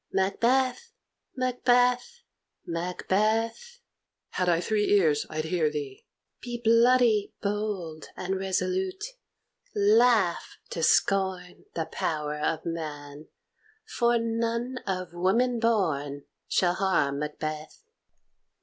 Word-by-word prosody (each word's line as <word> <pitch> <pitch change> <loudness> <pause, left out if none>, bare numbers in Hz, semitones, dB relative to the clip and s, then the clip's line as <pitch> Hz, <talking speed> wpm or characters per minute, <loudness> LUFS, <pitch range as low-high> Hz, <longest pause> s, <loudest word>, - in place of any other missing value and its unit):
"Macbeth! 255 - +1 0.4
Macbeth! 250 - +1 0.4
Macbeth!" 215 - -1 0.5
"Had 180 -1 -1
I 170 -1 +3
three 210 +3 0
ears, 155 -7 +3
I'd 155 0 -3
hear 160 -2 +1
thee." 145 -3 -6 0.3
"Be 240 -1 -5
bloody, 230 -2 +4
bold, 200 -6 -3
and 190 +1 -2
resolute; 370 - -1 0.7
laugh 210 -2 +3
to 165 - -3
scorn 185 +1 +1
The 165 - -1
power 150 -2 -3
of 155 +1 -1
man, 150 -3 -6 0.6
for 240 -1 +1
none 230 +2 -2
of 185 -2 -3
woman 230 +8 +1
born 155 -11 0 0.2
Shall 175 -1 +2
harm 175 -7 +1
Macbeth." 155 - -5
195 Hz, 95 wpm, -27 LUFS, 165-235 Hz, 0.7 s, bloody